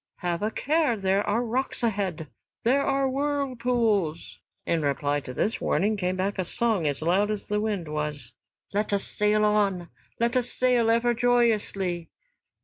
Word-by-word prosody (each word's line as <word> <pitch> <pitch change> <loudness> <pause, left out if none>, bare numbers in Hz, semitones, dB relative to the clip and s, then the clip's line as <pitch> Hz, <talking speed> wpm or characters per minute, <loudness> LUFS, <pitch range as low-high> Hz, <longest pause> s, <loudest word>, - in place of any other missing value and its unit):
"Have 175 -1 -1
a 210 - +1
care, 295 +1 +1
there 195 0 +1
are 225 +4 +1
rocks 250 +2 -2
ahead! 190 -8 -1 0.4
There 260 +4 +3
are 275 -1 +1
whirlpools!" 250 - -1 0.3
In 165 -1 +1
reply 145 0 0
to 135 - -8
this 210 - -1
warning 205 +7 +1
came 185 -2 -1
back 190 +2 -2
a - - +2
song 205 -2 0
as 145 +1 -2
loud 190 +5 +2
as 210 -1 -4
the 210 0 0
wind 205 -6 -2
was: 150 -5 -4 0.4
"Let 210 +1 0
us 200 - +1
sail 210 0 +1
on, 200 -4 +1 0.3
let 235 +2 +1
us 250 -1 +1
sail 245 -3 +2
ever 235 +1 +3
joyously." 215 -7 +1
210 Hz, 160 wpm, -26 LUFS, 175-235 Hz, 0.4 s, There